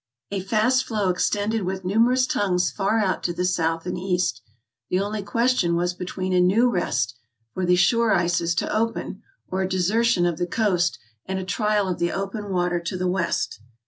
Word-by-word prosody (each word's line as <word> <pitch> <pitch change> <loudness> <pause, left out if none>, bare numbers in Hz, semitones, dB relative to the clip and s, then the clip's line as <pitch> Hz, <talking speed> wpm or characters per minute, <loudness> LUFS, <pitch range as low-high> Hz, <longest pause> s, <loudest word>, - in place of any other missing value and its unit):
A 200 - -1
fast 225 +6 +2
floe 210 -4 0
extended 205 +4 0
with 190 0 -4
numerous 235 +6 +3
tongues 180 -6 0
far 200 +2 0
out 200 -4 0
to 175 - -1
the 180 +1 -1
south 165 -2 0
and 180 0 -3
east. 180 -10 -1 0.5
The 185 - +1
only 205 +2 -2
question 230 -4 +1
was 175 +1 0
between 185 +1 -4
a 180 - +4
new 220 +7 +4
rest, 125 - 0 0.4
for 185 -1 -2
the 180 - +5
shore 225 +6 +3
ices 170 -1 +1
to - - -1
open, 225 -3 -2 0.3
or 190 +1 -2
a 190 - -1
desertion 195 +1 +2
of 170 -2 -1
the 175 - 0
coast 180 -4 +1 0.3
and 190 0 -2
a 190 - -4
trial 210 0 +1
of 180 - -2
the 170 0 0
open 195 +1 -4
water 175 -2 0
to 170 +2 -4
the 185 0 -1
west. 180 - -1
185 Hz, 190 wpm, -24 LUFS, 175-210 Hz, 0.5 s, the